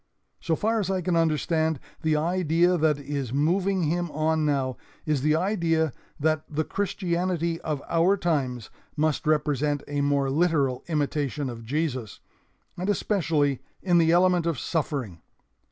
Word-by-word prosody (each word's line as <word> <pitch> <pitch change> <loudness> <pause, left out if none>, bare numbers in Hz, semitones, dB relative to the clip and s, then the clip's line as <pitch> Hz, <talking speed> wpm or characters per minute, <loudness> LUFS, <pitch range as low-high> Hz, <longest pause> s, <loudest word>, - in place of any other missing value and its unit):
So 160 - 0
far 225 +6 0
as 195 -3 -2
I 190 -1 0
can 180 0 0
understand, 160 -1 +1 0.2
the 160 -1 +2
idea 170 +2 +2
that 155 -3 +2
is 140 -3 -4
moving 180 +7 +1
him 170 +3 0
on 155 0 0
now 135 -3 0 0.3
is 150 -4 0
the 155 +2 +3
idea 165 - +1 0.3
that 155 +1 +1
the 155 +1 -1
Christianity 175 -3 -1
of 150 -3 -3
our 170 +4 +3
times 135 - -1 0.3
must 155 +1 0
represent 150 -1 +1
a 145 -1 -1
more 140 -1 +1
literal 145 -5 +1
imitation 145 -3 -1
of 115 -1 -9
Jesus, 130 -4 -2 0.6
and 185 +3 -3
especially 165 - +1 0.2
in 175 -2 +4
the 165 -1 +4
element 175 -1 +3
of 165 -4 0
suffering. 135 - -3
155 Hz, 145 wpm, -26 LUFS, 145-175 Hz, 0.6 s, in